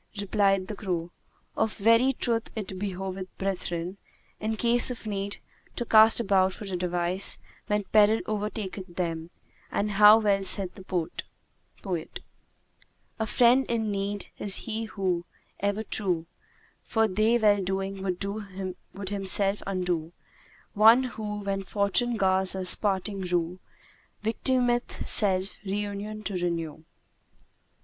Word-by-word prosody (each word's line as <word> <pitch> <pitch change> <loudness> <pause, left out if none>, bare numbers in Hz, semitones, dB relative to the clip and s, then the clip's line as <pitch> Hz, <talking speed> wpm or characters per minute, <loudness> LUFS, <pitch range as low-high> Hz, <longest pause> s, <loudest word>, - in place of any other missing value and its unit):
Replied 195 -1 +1
the - - -5
crow, 175 -4 -3 0.4
"Of 220 - -1
very 230 +5 +4
truth 230 -2 -1
it 190 -4 -5
behoveth 190 -1 -4
brethren, 180 -1 -3 0.4
in 220 +1 -2
case 235 +2 +4
of 245 -2 -7
need, 200 -1 -4 0.4
to 240 - -3
cast 220 0 +6
about 190 -4 +2
for - - -9
a 190 -2 -4
device 180 +1 +2 0.3
when 210 0 0
peril 215 +2 +4
overtaketh 205 -4 -4
them, 165 -2 -3 0.4
and 210 +1 -1
how 210 +2 +8
well 200 -3 +1
saith 190 -1 0
the 195 - -12
poet, 175 0 -6 1.0
A 220 - -1
friend 245 +4 +4
in 220 -3 -1
need 200 0 -3
is 200 -2 +1
he 225 -1 -3
who, 185 -5 -2 0.4
ever 205 +2 -1
true, 180 -7 -1 0.3
* - - -34
For 225 -1 +3
they 215 +4 +2
well 205 -3 +3
doing 195 +1 -3
would 195 0 -5
himself 200 0 +3
undo: 180 -4 -2 0.6
One 225 +5 +6
who 215 -4 -5
when 195 -1 -2
Fortune 205 +5 +1
gars 190 -1 +2
us 185 -1 +4
parting 195 -1 -1
rue 175 0 -1 0.3
* - - -34
Victimeth 240 +2 0
self 190 -2 +2
reunion 205 +1 -4
to 200 - -4
renew.'" 170 -3 -3
200 Hz, 130 wpm, -27 LUFS, 185-215 Hz, 1.0 s, how